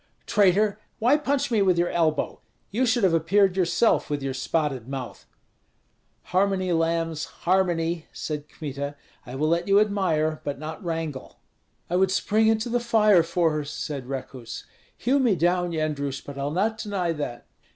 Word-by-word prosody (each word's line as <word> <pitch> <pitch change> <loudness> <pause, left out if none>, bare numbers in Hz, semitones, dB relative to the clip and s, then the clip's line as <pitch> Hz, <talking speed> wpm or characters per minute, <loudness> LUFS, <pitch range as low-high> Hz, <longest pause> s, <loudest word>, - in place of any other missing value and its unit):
"Traitor! 205 +1 +3 0.2
why 245 +6 +4
punch 285 -3 0
me 220 -3 +3
with 185 -3 +3
your 175 0 +1
elbow? 155 -3 0 0.3
You 245 +5 +1
should 240 -1 +2
have 185 -3 +4
appeared 190 +4 +3
yourself, 190 +5 +2
with 145 -2 -2
your 135 -1 -2
spotted 135 -2 -1
mouth." 135 -3 -7 1.0
"Harmony, 185 0 +1
lambs, 165 -1 0 0.2
harmony!" 175 -3 +1
said 150 -1 -5
Kmita; 140 -1 -5 0.3
"I 125 - -7
will 155 +3 0
let 170 +3 +1
you 200 +1 +5
admire, 175 -7 +1
but 145 -1 -3
not 155 +7 -7
wrangle." 160 -5 -4 0.5
"I 175 - 0
would 190 0 +3
spring 215 +3 +2
into 220 +1 +2
the 240 +1 +1
fire 215 -5 +4
for 165 0 +1
her," 150 -1 -2
said 145 -2 -5
Rekuts. 130 -3 -6 0.3
"Hew 265 +4 +2
me 240 -7 +3
down, 175 +1 +1
Yendrus, 145 -4 -2
but 140 - -10
I'll 140 +1 -2
not 210 +8 0
deny 195 -5 -1
that." 145 -6 -5
170 Hz, 160 wpm, -25 LUFS, 150-200 Hz, 1.0 s, you